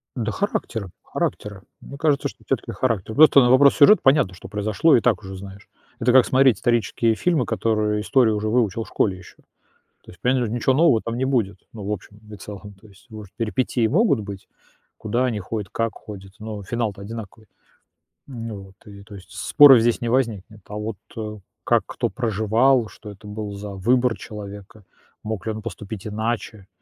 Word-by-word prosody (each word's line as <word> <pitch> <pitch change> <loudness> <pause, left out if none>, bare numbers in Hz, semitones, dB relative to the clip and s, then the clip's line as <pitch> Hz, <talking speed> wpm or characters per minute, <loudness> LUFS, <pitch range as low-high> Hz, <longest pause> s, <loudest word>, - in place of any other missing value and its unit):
Да 115 -4 -2
характера, 110 - -3
характера. 105 -2 -4 0.2
Мне 140 - -10
кажется, 145 -2 +1
что - - -13
всё-таки - - -2
характер. 110 -4 -2
Просто 155 -2 +7
на 125 -2 +4
вопрос 140 +2 +6
сюжета 210 +9 +6
понятно, 135 -9 +3
что 95 - -11
произошло, 105 +9 +2
и 120 - +3
так 110 -6 +1
уже 95 0 -8
знаешь. 100 +1 -11 0.3
Это 120 +2 +2
как 130 -1 +6
смотреть 130 -5 +4
исторические 115 -1 +1
фильмы, 155 -3 +1
которые 105 -2 0
истории 120 0 +3
уже 105 0 -2
выучил 115 -2 +1
в - - -15
школе 95 -3 0
ещё. 90 - -15 0.7
То - - -13
есть, 90 - -17
понятно, 125 -1 +1
ничего 120 +2 +1
нового 145 -7 +4
там 115 0 -3
не 130 - -1
будет, 115 -7 0
ну, 105 -3 -8
в 100 - -4
общем 105 +1 -8
и - - -7
целом. 100 +1 -10
То 110 - -17
есть, 105 +4 -21
может, 105 -3 -11
перипетии 115 0 0
могут 160 - +2
быть, 100 -2 -9 0.5
куда 120 +4 -1
они 115 -5 -1
ходят, 105 0 -5
как 115 -1 -2
ходят, 95 -3 -11
но 105 -2 -7
финал-то 110 -2 -3
одинаковый. 110 0 -9 0.8
Ну 115 -5 -7
вот. 95 - -18
И, 100 -1 -12
то 105 - -13
есть, 95 - -14
споров 140 -5 +7
здесь 120 0 +1
не 120 - -2
возникнет. 110 -4 -1
А 105 - -8
вот 105 -2 -5 0.7
как - - +3
кто - - -2
проживал, 115 +2 +1
что 105 0 -12
это 100 +1 -13
был 105 0 -6
за 100 +1 -7
выбор 120 +4 +1
человека, 105 0 -10 0.4
мог 110 -2 -5
ли 110 - -1
он 110 0 -7
поступить 110 -2 -7
иначе? 110 -1 -4
110 Hz, 185 wpm, -22 LUFS, 105-125 Hz, 0.8 s, Просто